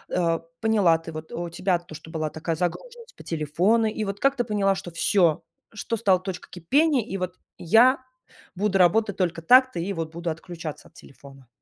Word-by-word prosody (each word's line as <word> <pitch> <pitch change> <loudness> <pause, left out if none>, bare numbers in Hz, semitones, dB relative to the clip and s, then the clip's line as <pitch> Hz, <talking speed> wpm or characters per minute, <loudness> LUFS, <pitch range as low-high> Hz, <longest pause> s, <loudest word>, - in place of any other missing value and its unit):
а, 165 -2 +1 0.2
поняла 205 -7 +3
ты 165 0 -9
вот, 155 0 -8
у 170 0 -4
тебя 180 +1 0
то, 175 -2 -14
что 160 - -11
была 155 -2 -2
такая 160 +1 -3
загруженность 470 - -5
по - - -13
телефону, 175 +9 +1
и 215 0 -3
вот 200 0 -5
как 275 0 +2
ты 245 - 0
поняла, 205 -3 +1
что 180 - -7
всё, 170 -1 +2 0.3
что 230 +2 -3
стало 195 -4 +3
точкой 185 -1 -7
кипения, 265 - +2
и 195 -2 -5
вот 180 -1 -3 0.2
я 235 +10 +4 0.6
буду 195 0 0
работать 205 +3 +3
только 170 -3 -1
так-то 255 +1 +5
и 195 +4 -2
вот 165 -2 -4
буду 170 +1 -4
отключаться 165 -1 -8
от - - -39
телефона. 135 -2 -16
180 Hz, 190 wpm, -25 LUFS, 165-220 Hz, 0.6 s, так-то